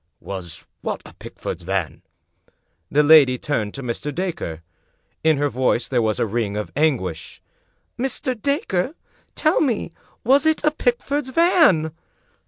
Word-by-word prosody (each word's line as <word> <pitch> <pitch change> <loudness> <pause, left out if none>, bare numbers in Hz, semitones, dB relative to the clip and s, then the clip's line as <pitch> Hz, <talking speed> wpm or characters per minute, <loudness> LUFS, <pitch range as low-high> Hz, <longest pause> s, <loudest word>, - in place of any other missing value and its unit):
"Was 90 -5 -7 0.2
what - - -4
a - - -12
Pickford's 90 - -7
van?" 95 -2 -3 0.9
The 150 +1 +3
lady 145 -4 +7
turned 110 -7 -2
to 135 - -6
Mr. 125 +4 -3
Dacre. 155 - -4 0.6
In 160 -2 +4
her 145 +1 +1
voice 130 -1 0
there 125 -3 +1
was 110 -3 0
a - - +2
ring 105 -2 -2
of 105 - -4
anguish. 120 - -1 0.6
"Mr. 260 0 -1
t)acre, 280 - -1 0.4
tell 310 +2 +2
me, 235 - 0 0.3
was 275 +5 +4
it 315 -1 +2
a 300 - +4
Pickford's 265 +1 -1
van?" 290 - +4
150 Hz, 140 wpm, -22 LUFS, -, 0.9 s, lady